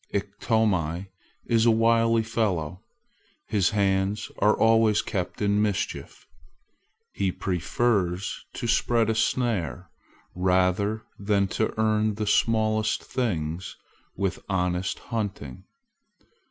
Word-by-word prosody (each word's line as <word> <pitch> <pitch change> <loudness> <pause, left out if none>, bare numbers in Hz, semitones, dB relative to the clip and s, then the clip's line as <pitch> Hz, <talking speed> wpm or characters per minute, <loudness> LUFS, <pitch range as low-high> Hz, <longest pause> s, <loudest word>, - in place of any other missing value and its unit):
Iktomi 100 -4 0 0.4
is 115 0 +3
a - - +7
wily 115 0 +3
fellow. 95 -7 -2 0.6
His 100 -4 +1
hands 100 0 0
are 105 - +4
always 110 -2 +4
kept 95 +2 -3
in 100 0 +2
mischief. 105 -3 -3 0.9
He 95 -2 0
prefers 95 +1 -1
to - - -5
spread 115 -1 +2
a - - +1
snare 100 - -1 0.4
rather 95 +4 +1 0.2
than 100 -1 +1
to 110 +3 -2
earn 110 -1 +2
the 105 0 -2
smallest 110 0 +1
thing 85 -9 -2 0.6
with 95 0 -2
honest 90 -1 -1
hunting. 100 - -5
105 Hz, 100 wpm, -26 LUFS, 95-110 Hz, 0.9 s, a